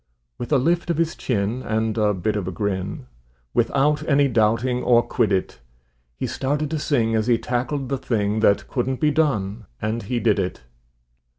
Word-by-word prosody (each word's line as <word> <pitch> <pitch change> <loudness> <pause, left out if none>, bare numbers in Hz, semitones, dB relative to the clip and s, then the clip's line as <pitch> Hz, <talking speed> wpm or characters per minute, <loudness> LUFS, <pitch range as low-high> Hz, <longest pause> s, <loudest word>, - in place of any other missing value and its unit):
With 120 - -5
a 145 - +5
lift 170 +6 +1
of 170 - +1
his 165 0 0
chin 115 +1 -1
and 110 -2 -1
a 105 -2 +2
bit 105 +4 -1
of 100 -4 -2
a - - -2
grin, 95 -3 -3 0.5
Without 145 +2 +2
any 140 -1 +4
doubting 120 +2 +1
or 120 -1 +4
quiddit, 100 -5 0 0.6
He - - -2
started 145 +2 -2
to 160 - -1
sing 115 -6 +1
as 110 0 +1
he 120 -2 +4
tackled 130 +4 -2
the 135 -1 -1
thing 105 -3 0
That 100 -2 +3
couldn't 130 0 -2
be 150 -1 +3
done, 110 - 0
and 110 +2 -2
he 120 +4 -2
did 110 -3 +2
it. 90 -8 -3
120 Hz, 180 wpm, -23 LUFS, 105-140 Hz, 0.6 s, a